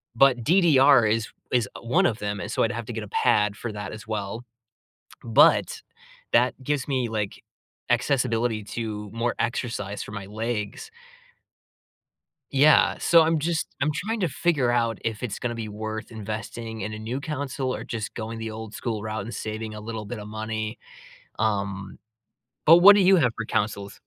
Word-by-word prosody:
but 125 -1 +4
DDR 145 -6 +5
is 110 0 0 0.2
is 120 -4 +2
1 160 +12 +2
of 115 -9 +1
them, 105 -1 -3
and 105 - -5
so - - +1
I'd 115 - +1
have 115 0 -5
to 120 - -6
get 110 -1 -4
a 105 - -8
pad 105 -1 +2
for 115 +1 -5
that 105 -2 -6
as 110 0 -10
well, 110 +1 -4 0.8
but 115 -2 +4 0.5
that 120 +2 +4
gives 145 0 -1
me, 130 -4 0
like, 105 -3 -4 0.5
accessibility 120 -3 +1
to 105 -1 -5
more 115 +1 -1
exercise 115 -4 -2
for - - -10
my 105 -2 -6
legs. 110 - -4 1.6
Yeah. 145 +2 +5
So, 165 -1 +6
I'm 160 0 +2
just 160 +2 -1
I'm 145 +2 +2
trying 220 +8 -3
to 180 - +1
figure 140 -4 +1
out 115 -1 +1
if 110 0 -3
it's 110 -5 -3
gonna 120 -1 -3
be 115 -2 -5
worth 110 +2 -5
investing 110 +1 -6
in 110 - -4
a 110 - -6
new 120 +5 -4
console 140 -3 -3
or - - -7
just 110 -2 -5
going 115 0 -5
the 110 0 -4
old 110 0 -8
school 110 -4 -3
route 110 0 -4
and 115 - -7
saving 110 0 -5
a 105 - -7
little 110 0 -6
bit 110 +3 -6
of 105 0 -8
money. 110 0 -4 0.6
Um, 100 -3 -2 0.7
but 165 +2 +9
what 200 +3 +9
do 205 - +4
you 190 +1 +6
have 130 -8 +3
for 110 - -4
consoles? 100 -2 -2
115 Hz, 180 wpm, -25 LUFS, 110-130 Hz, 1.6 s, but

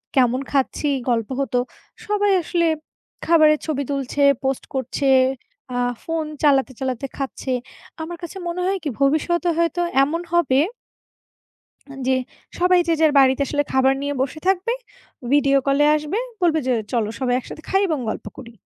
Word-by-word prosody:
কেমন 255 -1 +3
খাচ্ছি, 280 +2 0 0.2
গল্প 230 -3 0
হতো, 270 -2 -1 0.5
সবাই 410 -1 +1
আসলে 340 +1 0 0.6
খাবারের 310 -2 +5
ছবি 290 -3 -1
তুলছে, 275 0 -2 0.2
পোস্ট 265 -1 -1
করছে, 265 +1 -1 0.7
আ - - -1 0.3
ফোন 325 -1 -2 0.2
চালাতে, 275 -2 +3
চালাতে 260 -1 -2
খাচ্ছে। 270 -1 -4 0.5
আমার 340 +2 -6
কাছে 345 +3 -7
মনে 350 +1 -3
হয় 390 +1 +1
কি, 300 - -1
ভবিষ্যতে 340 +5 +2
হয়তো 335 +1 +1 0.2
এমন 325 +5 -1
হবে 280 -6 +3 1.3
আন 270 - -10
জে 260 - +3 0.4
সবাই 360 0 +4
যে - - +4
যার 315 -2 +5
বাড়িতে 265 0 +4
আসলে 290 +1 0
খাবার 265 0 +4
নিয়ে 285 0 -2
বসে 280 +3 -4
থাকবে, 385 +5 +1 0.6
ভিডিও 275 -1 +4
কল 275 0 +2
এ - - +5
আসবে, 305 +7 -3 0.2
বলবে 330 -3 +3
যে, 255 - +2 0.2
"চলো 230 -4 +1
সবাই 250 -1 0
একসাথে 310 +4 -9
খাই 390 +1 +2
এবং 310 -4 0
গল্প - - -6
করি।" 240 -3 -10
290 Hz, 160 wpm, -21 LUFS, 265-335 Hz, 1.3 s, খাবারের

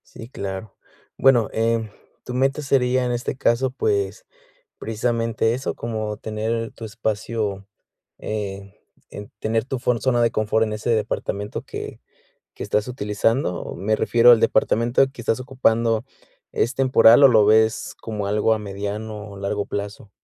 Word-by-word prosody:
Sí, 115 - -9
claro. 100 -3 -6 0.4
Bueno, 125 -5 +4
em, 115 -1 0 0.4
tu 125 - -6
meta 135 +3 +1
sería, 130 -2 +1
en 120 - -1
este 120 +2 -3
caso, 125 +1 +1
pues, 410 - -1 0.5
precisamente 115 0 -1
eso, 130 +3 -3
como 110 -2 -4
tener 110 +1 -3
tu 115 - -9
espacio, 105 -2 -3 0.5
eh, 100 -2 -5 0.4
en, 105 0 -9
tener 110 0 -1
tu 135 -1 -3
fon 125 -2 0
zona 120 -2 +2
de 115 - +2
confort 110 +1 +1
en 105 - -4
ese 105 +3 -4
departamento 105 -2 -2
que - - -8 0.5
que - - -9
estás 105 +2 0
utilizando. 105 -3 -1
Me 110 +2 0
refiero 120 +1 +5
al 115 - +6
departamento 120 +4 +2
que 125 - -11
estás 115 +2 0
ocupando, 115 -3 +1 0.5
¿es 120 - 0
temporal 130 0 +6
o - - +10
lo 110 -4 +5
ves 110 +1 +3
como 105 -3 -4
algo 105 +2 +2
a 110 - +1
mediano 105 +1 -6
o 100 - -10
largo 100 +1 -2
plazo? 105 +2 -6
115 Hz, 150 wpm, -22 LUFS, 105-120 Hz, 0.5 s, o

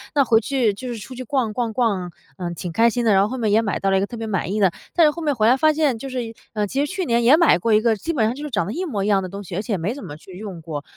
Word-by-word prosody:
那 285 - +5
回 225 -2 +4
去 240 -3 +1
就 255 +6 -8
是 240 -2 -4
出 225 +5 -9
去 255 - -6
逛 245 -3 -1
逛 235 -1 -2
逛， 200 -7 0 0.3
嗯， 175 -1 -4
挺 175 +1 -5
开 230 +7 +4
心 240 +1 -2
的， 220 - +4
然 195 - +5
后 200 - +2
后 260 - -4
面 220 -4 0
也 220 +2 +4
买 210 -3 -2
到 195 - 0
了 195 - +3
一 - - +2
个 195 - 0
特 240 - -8
别 225 - -4
满 190 -3 -2
意 215 - -1
的。 190 -3 +4 0.2
但 335 - +5
是 300 - +5
后 335 - -8
面 295 -3 0
回 215 -2 +2
来 245 - +6
发 310 +3 +4
现 295 -6 +1
就 270 +4 -7
是 245 -3 -4 0.2
呃， 210 -2 0
其 275 +7 0
实 290 - -7
去 375 - -2
年 235 -3 +1
也 250 +5 +7
买 335 - +5
过 225 +5 +1
一 215 - +5
个 225 -1 +2
基 325 +11 -4
本 235 -8 +2
上 225 - 0
就 290 - -8
是 300 - -4
长 205 -9 0
得 200 - -4
一 365 +6 -3
模 210 - -2
一 - - -1
样 200 -2 +3
的 185 - -5
东 200 +2 -7
西， 180 -2 -7
而 195 - -1
且 220 0 -3
也 - - +1
没 180 +7 -2
怎 280 - -9
么 145 -4 -8
去 180 +3 -13
用 195 -5 -7
过。 155 -3 -6
225 Hz, 400 characters per minute, -22 LUFS, 195-260 Hz, 0.3 s, 也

